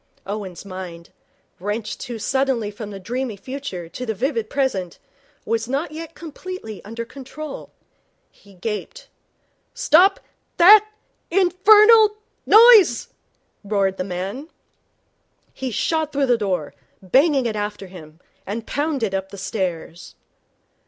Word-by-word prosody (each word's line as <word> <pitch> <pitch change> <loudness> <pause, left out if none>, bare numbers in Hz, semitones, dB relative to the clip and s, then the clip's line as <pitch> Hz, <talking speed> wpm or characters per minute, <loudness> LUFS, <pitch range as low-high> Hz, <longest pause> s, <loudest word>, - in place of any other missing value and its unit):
Owen's 195 -3 -6
mind, 185 -3 -9 0.5
wrenched 210 +3 -4
too 240 -2 -6
suddenly 245 -1 -1
from 210 0 -8
the 200 -1 -8
dreamy 235 +3 -4
future 255 -8 -7
to 245 - -7
the 220 -3 -3
vivid 230 -1 -2
present, 200 -11 -2 0.5
was 225 +1 -1
not 280 +5 -2
yet 325 +1 -8
completely 330 - -8
under 230 +3 -6
control. 275 +4 -9 0.6
He 200 -1 -21
gaped. 220 - -6 0.7
'Stop 390 -6 +4 0.4
that 415 +4 +8 0.4
infernal 420 +4 +6 0.3
noise!' 435 - +7 0.5
roared 195 -2 0
the - - -2
man. 195 - -5 1.0
He 265 - -4
shot 315 +6 -1
through 280 -1 +1
the 245 -2 +3
door, 185 -8 -2 0.3
banging 270 - +3
it 225 -2 -2
after 205 -1 -4
him, 165 -4 -13 0.2
and 220 +3 -5
pounded 280 -8 -2
up 190 0 -3
the 200 - -10
stairs. 180 -4 -5
230 Hz, 120 wpm, -21 LUFS, 195-305 Hz, 1.0 s, that